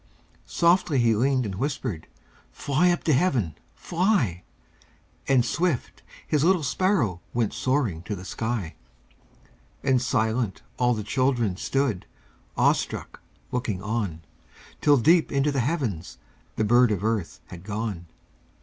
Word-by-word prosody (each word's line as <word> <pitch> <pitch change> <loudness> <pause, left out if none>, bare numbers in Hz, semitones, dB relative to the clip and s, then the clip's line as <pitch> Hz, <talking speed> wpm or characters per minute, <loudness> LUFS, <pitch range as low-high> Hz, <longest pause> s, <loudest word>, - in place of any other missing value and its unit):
Softly 170 -3 +2
He 120 -2 +4
leaned 130 +3 +1
and 100 - -4
whispered: 110 - -3 0.4
"Fly 150 +6 +1
up 175 - 0
to 155 - +2
Heaven! 130 - +1 0.2
Fly!" 165 - 0 0.9
And 130 -3 +4
swift, 170 -3 -1 0.2
His 150 -2 +1
little 180 -1 +3
sparrow 140 - +1
Went 115 -4 0
soaring 130 - 0
to 105 - -3
the 90 0 -9
sky, 110 -7 -3 1.1
And 130 -2 +3
silent, 110 -3 0 0.2
all 125 -1 +3
the 105 - -4
children 120 -3 +1
Stood, 130 -1 -1 0.5
awestruck, - - 0 0.3
looking 110 -7 -2
on, 105 -7 -3 0.6
Till, 145 -1 +5
deep 165 +7 +4
into 140 +1 +1
the 140 - -1
heavens, 120 - -2 0.4
The - - 0
bird 120 +3 +5
of 100 -1 -1
earth 110 -6 -1
had 85 -1 -10
gone. 100 -4 -4
120 Hz, 130 wpm, -25 LUFS, 105-140 Hz, 1.1 s, Till